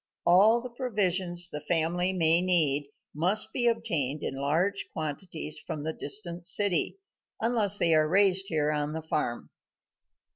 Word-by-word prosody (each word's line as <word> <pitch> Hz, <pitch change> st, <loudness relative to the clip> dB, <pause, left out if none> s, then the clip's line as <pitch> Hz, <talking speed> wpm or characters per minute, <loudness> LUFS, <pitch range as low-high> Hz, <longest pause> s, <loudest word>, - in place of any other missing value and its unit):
All 210 Hz, +7 st, +5 dB
the 250 Hz, -, -7 dB
provisions 185 Hz, -8 st, 0 dB
the 150 Hz, -, -5 dB
family 170 Hz, +3 st, -1 dB
may 165 Hz, -2 st, +3 dB
need 150 Hz, -6 st, +2 dB, 0.2 s
must 195 Hz, +8 st, +1 dB
be 240 Hz, -1 st, 0 dB
obtained 165 Hz, -, -1 dB
in -, -, -3 dB
large 160 Hz, +9 st, -1 dB
quantities 155 Hz, 0 st, -4 dB
from 150 Hz, -1 st, -6 dB
the 160 Hz, +1 st, -3 dB
distant 170 Hz, +1 st, -3 dB
city, 200 Hz, -, +1 dB, 0.4 s
unless 220 Hz, -4 st, +2 dB
they 170 Hz, -4 st, +2 dB
are 155 Hz, -1 st, +3 dB
raised 195 Hz, +1 st, +3 dB
here 150 Hz, -3 st, 0 dB
on 150 Hz, 0 st, -2 dB
the 160 Hz, 0 st, -5 dB
farm. 150 Hz, -6 st, -3 dB
175 Hz, 145 wpm, -28 LUFS, 155-200 Hz, 0.4 s, All